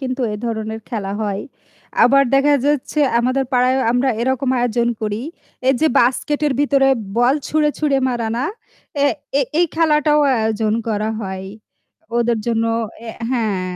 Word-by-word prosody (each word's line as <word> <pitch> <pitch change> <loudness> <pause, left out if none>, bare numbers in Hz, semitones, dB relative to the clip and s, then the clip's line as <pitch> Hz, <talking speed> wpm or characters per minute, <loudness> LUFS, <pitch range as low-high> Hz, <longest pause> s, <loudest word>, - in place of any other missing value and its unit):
কিন্তু 260 -1 -3
এ - - -3
ধরনের 220 -1 -4
খেলা 205 -5 -4
হয়। 200 -2 -2 0.6
আবার 275 +2 +5
দেখা 285 +2 +4
যাচ্ছে 295 +1 0 0.2
আমাদের 255 +3 +1
পাড়ায়ও 255 +1 +3
আমরা 250 +2 +1
এরকম 260 +1 0
আয়োজন 240 0 +1
করি। 215 +1 -3 0.5
এই 265 - +5
যে 315 - +4
বাস্কেটের 290 +4 +1
ভিতরে 275 -2 +3 0.3
বল 245 +3 +4
ছুঁড়ে, 300 -1 +2
ছুঁড়ে 290 -3 +1
মারা 240 -3 -2
না? 250 - -1 0.6
এ - - +5 0.3
এ - - +3 0.2
এই 350 - +4
খেলাটাও 300 -2 +3 0.2
আয়োজন 220 -1 0 0.2
করা 215 0 -1
হয়। 190 -2 -5 0.7
ওদের 235 -1 +1
জন্য, 230 -1 0 0.4
এ - - -4 0.2
হ্যাঁ, 195 -7 -1
245 Hz, 150 wpm, -19 LUFS, 220-275 Hz, 0.7 s, আবার